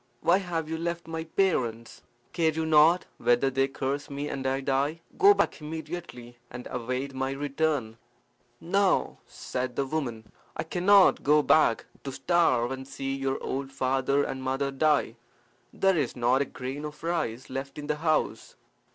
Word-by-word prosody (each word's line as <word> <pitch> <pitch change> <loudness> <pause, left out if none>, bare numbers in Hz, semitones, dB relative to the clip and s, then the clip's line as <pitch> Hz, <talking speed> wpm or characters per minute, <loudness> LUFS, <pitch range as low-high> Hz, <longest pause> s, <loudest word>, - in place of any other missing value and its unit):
"Why 180 +3 +4
have 170 -4 -3
you 160 0 -4
left 170 0 -3
my 160 0 -4
parents? 125 - -1 0.3
Care 165 -2 +2
you 160 +1 -2
not 160 +3 +5
whether 120 +3 +2
they 135 +1 +2
curse 140 +2 -3
me 145 +1 -4
and 135 -1 -3
I 135 +1 0
die? 140 +4 -1
Go 405 +1 +6
back - - 0
immediately, 150 -6 -7
and 120 0 -8
await 125 +3 -3
my 135 +1 -2
return." 140 -4 -1 0.6
"No, 195 +2 +3
no," - - -10
said 125 -1 -4
the 140 - 0
woman. 120 -7 -4 0.3
"I - - -1
cannot 185 +4 +4
go 150 +1 +4
back 140 -8 +3 0.2
to 135 - -5
starve 130 -6 +2
and 130 0 -6
see 135 0 -4
your 135 0 -1
old 135 0 -3
father 135 +1 +1
and 130 -1 -4
mother 135 +1 -1
die. 140 -4 +1 0.5
There 195 -1 +2
is 135 -5 -2
not 125 +2 +2
a - - +1
grain 135 +3 -6
of 150 +1 -8
rice 135 -9 -2
left 135 +1 -5
in 150 - -6
the 150 0 -1
house." 155 0 -1
140 Hz, 170 wpm, -27 LUFS, 130-160 Hz, 0.6 s, Go